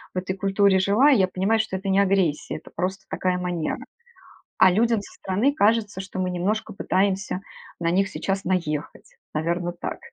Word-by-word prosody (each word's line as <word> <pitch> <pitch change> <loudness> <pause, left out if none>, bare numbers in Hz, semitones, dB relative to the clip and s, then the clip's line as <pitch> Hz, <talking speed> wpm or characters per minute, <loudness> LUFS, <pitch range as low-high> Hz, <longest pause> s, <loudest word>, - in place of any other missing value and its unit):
в - - +1
этой 185 +1 -4
культуре 195 0 +3
жила, 205 +9 +4
я 200 -9 +4
понимаю, 195 +5 +1
что 215 -3 -1
это 195 +1 -4
не 195 +1 +3
агрессия, 190 -6 +1
это 155 - -14
просто 190 +2 -3
такая 185 -1 0
манера. 175 -3 -2 0.8
А 185 - +7
людям 225 +2 +2
со 200 - -12
стороны 210 +10 0
кажется, 210 -6 +2
что 190 0 -7
мы 185 0 0
немножко 205 +5 -1
пытаемся 195 -1 0 0.4
на 170 -1 +1
них 195 +3 +2
сейчас 195 -1 -3
наехать. 165 -5 -3 0.2
Наверное, 170 +3 -1
так. 175 - -5
190 Hz, 170 wpm, -24 LUFS, 180-200 Hz, 0.8 s, А